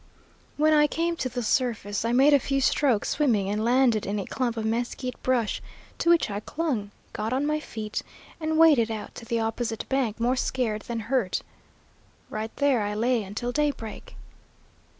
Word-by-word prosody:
When 310 +1 +4
I 295 -1 +5
came 335 +2 -1
to 255 - -2
the 245 0 -3
surface 220 -4 0
I 230 - 0
made 270 +4 +5
a 285 - +6
few 275 +1 0
strokes 260 -4 +2
swimming 230 -10 +2
and 210 +1 -1
landed 240 -2 +3
in 205 +1 -1
a 195 - -3
clump 240 -3 -2
of 220 - -2
mesquite 240 +3 -2
brush, 245 -4 0 0.4
to 335 - +1
which 335 -10 +4
I 200 - -2
clung, 250 -5 -2 0.2
got 220 +3 -2
on 270 +3 +1
my 305 +1 +1
feet, 220 -7 -5 0.4
and 315 0 -1
waded 300 -9 +6
out 220 -2 -5
to 230 - -10
the 230 0 -1
opposite 225 0 -2
bank 250 -5 0
more 245 +2 +2
scared 245 -4 -1
than 230 -1 -3
hurt. 225 -4 0 0.9
Right 215 +1 -3
there 280 -5 +2
I 205 0 -2
lay 235 +2 +1
until 215 +5 -4
daybreak. 285 -6 -3
240 Hz, 180 wpm, -26 LUFS, 220-275 Hz, 0.9 s, a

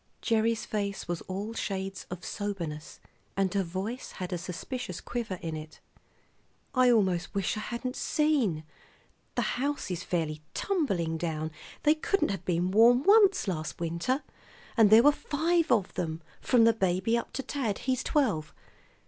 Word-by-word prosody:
Gerry's 225 -1 +1
face 200 -2 -3
was 175 -1 -3
all 200 +4 -4
shades 195 -3 -4
of 180 0 -7
soberness, 170 -7 -5 0.4
and 195 -2 +1
her 200 - +2
voice 190 +8 -4
had 180 0 -5
a - - 0
suspicious 185 +3 -5
quiver 235 -6 -4
in 165 -1 -3
it. 155 0 -9 0.9
"I 255 -1 +5
almost 190 -5 +2
wish 195 +2 0
I - - -3
hadn't 240 +3 -4
seen. 270 - +1 0.7
The - - +1 0.2
house 285 -7 -1
is 175 -1 -3
fairly 155 -3 -2
tumbling 190 - 0
down; 160 -2 -2 0.3
they 300 - +6
couldn't 390 +5 0
have 195 -4 -5
been 175 +1 +1
warm 235 +5 +6
once 400 - +5
last 160 -4 -3
winter. 170 - -1 0.5
And 225 -4 +6
there 220 +2 +8
were 290 - +8
five 325 +3 0
of 210 -6 +2
them, 160 -2 -3 0.2
from 245 -3 +4
the 230 0 +6
baby 190 +1 +1
up 235 - -2
to 270 - -3
Tad; 240 -9 -2
he's 260 -1 +1
twelve. 210 - 0
200 Hz, 155 wpm, -29 LUFS, 175-250 Hz, 0.9 s, there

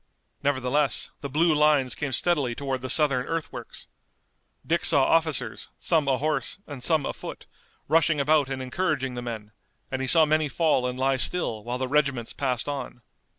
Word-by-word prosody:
Nevertheless 140 +1 +1
the 140 - -6
blue 160 +4 +2
lines 150 -4 +3
came 145 -2 -3
steadily 140 -4 +1
toward 135 -2 -3
the 130 - -5
Southern 140 -5 +3
earthworks. 165 -1 -5 0.8
Dick 170 +1 0
saw 145 -5 +5
officers, 160 -2 0
some 155 -4 +1
ahorse, 140 +4 0
and 145 -4 -9
some 155 +1 +1
afoot, - - -7 0.4
rushing 160 -1 +3
about 145 -1 +2
and 130 -1 -4
encouraging 130 -2 -2
the 120 - -5
men, 110 -3 -7 0.4
and 130 0 -2
he 130 - -2
saw 160 +3 +6
many 155 0 +1
fall 150 -5 +1
and 125 0 -4
lie 135 +1 +1
still 120 -7 0
while 120 +2 -3
the 130 0 -2
regiments 140 -4 0
passed 130 -3 -2
on. 135 -4 -5
140 Hz, 165 wpm, -25 LUFS, 130-155 Hz, 0.8 s, saw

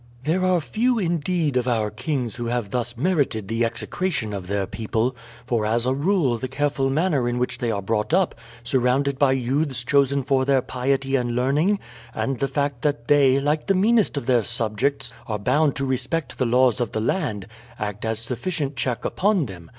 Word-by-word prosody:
"There 165 +6 +1
are 185 -1 +3
few, 235 +9 0
indeed, 170 - 0
of 125 0 0
our 110 -4 0
kings 120 0 -3
who 120 -1 -3
have 120 -4 -2
thus 120 0 -1
merited 140 - 0
the 115 +2 0
execration 115 - -2
of 95 -3 -5
their 100 0 -1
people, 115 +5 -2 0.3
for 120 -3 0
as 115 +2 0
a 130 - +2
rule 145 - +1
the 130 - -3
careful 135 0 0
manner 145 -4 +1
in 120 - -2
which 125 0 -2
they 120 - -1
are 100 -3 -2
brought 105 +3 -1
up, 185 +1 +2 0.3
surrounded 130 +3 +1
by 140 -2 +4
youths 135 0 0
chosen 140 0 +2
for 135 0 +2
their 135 -1 +2
piety 135 +1 -1
and 120 -2 0
learning, 145 +11 +2 0.4
and 135 -3 -2
the 135 - +1
fact 140 -3 -2
that 145 -5 -1
they, 140 -2 +5
like 150 +2 0
the 195 - +3
meanest 210 -2 +3
of 140 - -3
their 125 -3 +3
subjects, 120 +3 -1
are 110 -2 -2
bound 140 +8 +2
to 135 - +5
respect 130 +2 -2
the 130 - +2
laws 125 +1 +3
of 120 - -2
the - - -1
land, 110 - -1 0.3
act 105 -1 -4
as 110 0 -1
sufficient 135 +6 -3
check 125 -1 -2
upon 195 -5 +1
them. 85 -6 -10
130 Hz, 195 wpm, -23 LUFS, 115-145 Hz, 0.4 s, they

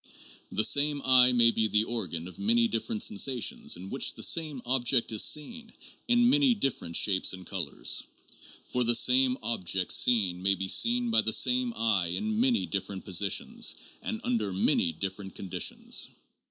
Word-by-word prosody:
The 110 - 0
same 145 +3 +2
eye 125 -1 +6
may 120 -1 +4
be 110 -1 0
the 105 +1 +1
organ 95 -8 -4
of 90 -1 -12
many 115 +3 +2
different 110 -1 -3
sensa 125 +5 0
tions 95 - -2
in 95 +2 -10
which 135 - -1
the - - -3
same 155 -5 0
object 125 -1 0
is 110 - +2
seen 225 +9 -2 0.4
in 240 0 +3
many 270 -1 +3
different 135 - -3
shapes 95 0 +2
and 95 -1 -10
colors; - - -2 0.6
for 125 - -2
the 120 0 +4
same 125 +2 +3
object 95 -5 -1
seen 95 -7 +2
may 95 +1 +1
be 95 +1 -5
seen 240 - +2
by 225 - +3
the - - -2
same 250 -1 +2
eye 105 -6 0
in 215 - -3
many 245 -1 +1
different 100 -1 -5
positions 95 0 0 0.3
and 110 - -5
under 110 -5 -2
many 90 -2 +1
different 95 +3 -6
conditions. 95 -3 -1
115 Hz, 165 wpm, -28 LUFS, 95-140 Hz, 0.6 s, eye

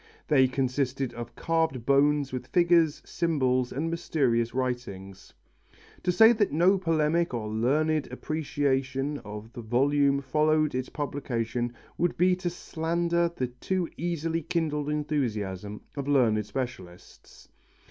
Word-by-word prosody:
They 135 -4 +5
consisted 130 0 -1
of 120 0 -8
carved 160 -7 0
bones 140 0 +3
with 130 - -4
figures, 170 -3 +3
symbols 130 -7 0
and 150 +5 -2
mysterious 130 -9 0
writings. 120 -7 -4 0.7
To 180 - +1
say 225 +6 +7
that 215 -3 +1
no 180 +5 +4
polemic 165 -3 +1
or 110 -2 -3
learned 145 +8 +1
appreciation 140 -2 -1
of 105 +1 -9
the 120 - -7
volume 140 +4 +2
followed 155 +3 +1
its 130 0 -3
publication 120 -4 -3 0.3
would 175 0 +1
be 180 +1 +4
to 180 -1 -2
slander 170 0 -1
the 130 - -1
too 175 +8 -2
easily 165 -1 -2
kindled 155 -3 -1
enthusiasm 105 -10 -2
of 140 -1 -4
learned 120 -7 +3
specialists. 105 -7 -8
140 Hz, 125 wpm, -27 LUFS, 125-160 Hz, 0.7 s, say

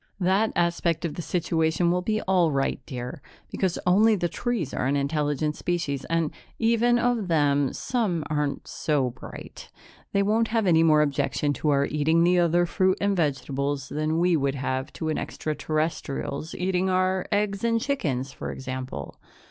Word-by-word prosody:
"That 195 +4 +2
aspect 170 -1 +1
of 160 - -2
the - - -5
situation 165 +1 +1
will 180 +1 +1
be 215 +3 -1
all 180 -4 +3
right, 135 -1 0
dear, 125 -1 -6 0.3
because 185 -3 -1
only 210 +5 +5
the 175 -3 0
trees 185 - -2
are 130 - -1
an 140 - +1
intelligent 150 +1 0
species 165 -6 -2
and, 165 -2 0 0.3
even 235 +1 +3
of 240 -4 +1
them, 145 -4 +2
some 205 -10 -1
aren't 150 -2 -2
so 140 -5 0
bright. - - -10 0.4
They 200 - +2
won't 220 +3 +2
have 225 -1 0
any 165 -3 +5
more 155 -2 +5
objection 145 0 0
to 150 - -1
our 140 -1 +3
eating 160 +3 +2
the 180 +1 +4
other 175 0 +3
fruit 185 +2 +1
and 200 0 +1
vegetables 140 -3 -1
than 155 +1 -1
we 175 0 +3
would 140 -2 0
have 130 0 -2
to 160 - -3
an 155 - -1
extraterrestrial's 155 -1 -3
eating 185 +1 0
our 185 0 +1
eggs 205 0 0
and 230 -1 +2
chickens, 145 - -2
for - - -6
example. 130 - -6
165 Hz, 165 wpm, -26 LUFS, 145-185 Hz, 0.4 s, only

